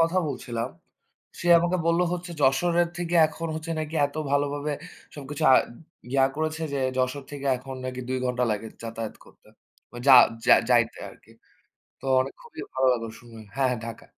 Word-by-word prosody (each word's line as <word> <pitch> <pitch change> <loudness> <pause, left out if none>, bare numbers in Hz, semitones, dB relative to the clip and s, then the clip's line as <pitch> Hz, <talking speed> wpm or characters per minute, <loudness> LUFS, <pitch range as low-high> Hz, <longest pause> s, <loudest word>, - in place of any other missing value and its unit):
কথা 165 +3 +3
বলছিলাম। 120 -4 -4 0.7
সে 175 - -3
আমাকে 175 +2 0
বললো 170 +1 +3
হচ্ছে 180 0 -6
যশোরের 170 +6 +3
থেকে 175 0 -2
এখন 165 +2 -6
হচ্ছে 160 +1 -5
নাকি 155 +1 -5
এত 145 - -8 0.2
ভালোভাবে 145 +1 0 0.4
সবকিছু 145 +1 -6
আ - - +8 0.6
ইয়া 135 0 +4
করেছে 155 +1 -2
যে - - 0 0.2
যশোর 130 +2 -1
থেকে 140 -1 -7
এখন 130 +1 -8
নাকি 130 0 -5
২ 130 - 0
ঘন্টা 125 0 0
লাগে 105 +1 -3 0.2
যাতায়াত 115 -1 -5
করতে। - - -22 0.4
মা 120 - -10
যা, 135 - +9 0.3
যা - - +8 0.2
যাইতে 120 -2 +3
আরকি। 105 - -19 0.7
তো - - -16 0.2
অনেক 135 +1 -3
খুবই - - -10
ভালো 130 0 +2
লাগলো 115 -2 -3
শুনে 120 -1 -16 0.2
হ্যাঁ, 135 -1 +2
হ্যাঁ 125 - -1
ঢাকা। 115 -1 -9
140 Hz, 175 wpm, -26 LUFS, 125-160 Hz, 0.7 s, যা